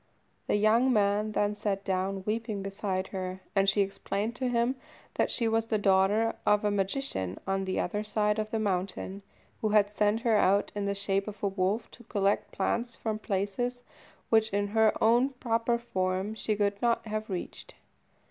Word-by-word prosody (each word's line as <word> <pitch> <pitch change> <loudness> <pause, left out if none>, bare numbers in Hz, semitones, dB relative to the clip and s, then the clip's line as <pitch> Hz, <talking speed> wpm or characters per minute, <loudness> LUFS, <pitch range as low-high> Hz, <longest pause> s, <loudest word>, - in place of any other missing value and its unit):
The - - +2
young 220 +5 +4
man 210 -1 +2
then 205 0 +1
sat 200 -1 -2
down 190 0 -1
weeping 215 -2 -2
beside 195 -1 -3
her, 185 -1 -4 0.2
and 195 0 +4
she 200 +1 +2
explained 200 +3 -2
to 260 - -1
him 240 +1 +1 0.4
that - - +1
she 235 - +1
was 225 0 +1
the 220 - +1
daughter 200 +3 +3
of 210 0 +3
a 205 - +2
magician, 195 - -2
on 195 0 -1
the 185 - -1
other 210 +4 -1
side 210 0 0
of 215 0 -2
the 225 - -1
mountain, 195 -1 -2 0.4
who 215 - +1
had 205 -1 +4
sent 210 +2 +1
her 230 -2 +3
out 200 0 +3
in 205 -1 -2
the 200 - 0
shape 195 0 -1
of 210 -1 -8
a - - +3
wolf 195 +3 -1
to 240 - -14
collect 200 -1 0
plants 235 +4 -1
from 215 -1 -3
places 215 +5 -2 0.5
which, 220 -1 +4
in 205 0 0
her 220 0 +4
own 240 +4 +4
proper 235 -1 0
form, 190 -3 -2
she 220 -1 -1
could 200 -1 0
not 235 -1 +1
have 215 0 -4
reached. 185 -2 -6
210 Hz, 185 wpm, -29 LUFS, 195-225 Hz, 0.5 s, young